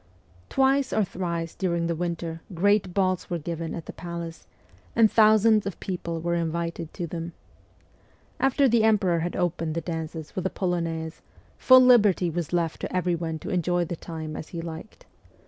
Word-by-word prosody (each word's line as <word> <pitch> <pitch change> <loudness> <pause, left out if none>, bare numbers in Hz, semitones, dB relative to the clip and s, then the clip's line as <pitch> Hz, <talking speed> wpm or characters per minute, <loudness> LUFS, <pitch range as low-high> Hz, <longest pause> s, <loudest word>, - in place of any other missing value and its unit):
Twice 270 0 +2
or 215 - +2
thrice 170 -3 -3
during 170 -3 -1
the 170 - 0
winter 170 -1 -4
great 200 +1 +2
balls 185 -1 0
were 175 - -1
given 165 0 -4
at 165 - -7
the - - -8
palace, 170 -1 -7 0.5
and 225 -2 +5
thousands 215 -1 +5
of 195 - -5
people 170 -3 -4
were 170 +1 -1
invited 170 -1 -2
to 175 - -3
them. 170 0 -6 1.1
After 270 +1 +3
the 235 -2 +3
emperor 195 -6 +3
had 175 +2 -3
opened 170 -3 -1
the - - 0
dances 160 -2 -5
with 185 0 -1
a - - -3
polonaise, 165 -4 -3 0.4
full 255 0 +8
liberty 210 -8 +5
was 170 -2 -3
left 170 -2 -1
to - - -4
every 180 -1 +1
one 165 -1 -3
to - - -3
enjoy 175 -1 +1
the 170 +1 -4
time 160 -2 -7
as - - -6
he 170 - -7
liked. 165 +5 -8
175 Hz, 175 wpm, -26 LUFS, 165-195 Hz, 1.1 s, full